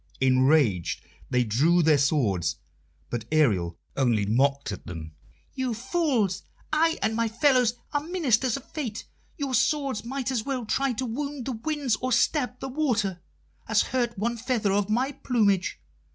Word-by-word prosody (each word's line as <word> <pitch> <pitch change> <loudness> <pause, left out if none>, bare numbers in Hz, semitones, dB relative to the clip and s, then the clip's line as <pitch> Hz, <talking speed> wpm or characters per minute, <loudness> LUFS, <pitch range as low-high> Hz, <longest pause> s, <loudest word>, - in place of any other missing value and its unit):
Enraged, 130 - +3 0.3
they 125 0 +2
drew 150 +11 +3
their 155 -2 +4
swords, 100 - +1 0.6
but 120 -2 -2
Ariel 100 - +2 0.2
only 120 -6 +2
mocked 135 +5 +1
at 100 - -8
them. 80 -3 -7 0.4
"You 260 -3 -2
fools! 250 - 0 0.3
I 325 +1 +3
and 220 - +1
my 230 0 +1
fellows 245 0 +3 0.2
are 290 - +1
ministers 275 - +1
of 275 - -11
Fate. 245 -9 -4 0.3
Your 280 -3 -3
swords 275 -5 +1
might 260 +1 -3
as 240 -4 -1
well 255 -3 -3
try 270 +4 0
to 255 +3 -3
wound 280 +2 -4
the 270 - -2
winds 260 0 -1
or 255 +2 -3
stab 250 +1 +1
the - - -5
water, 230 - -1 0.5
as - - +3
hurt 240 -3 -1
one 235 +4 -1
feather 230 -4 0
of 205 0 +1
my 250 +6 +1
plumage. 210 -9 +1
225 Hz, 155 wpm, -26 LUFS, -, 0.6 s, their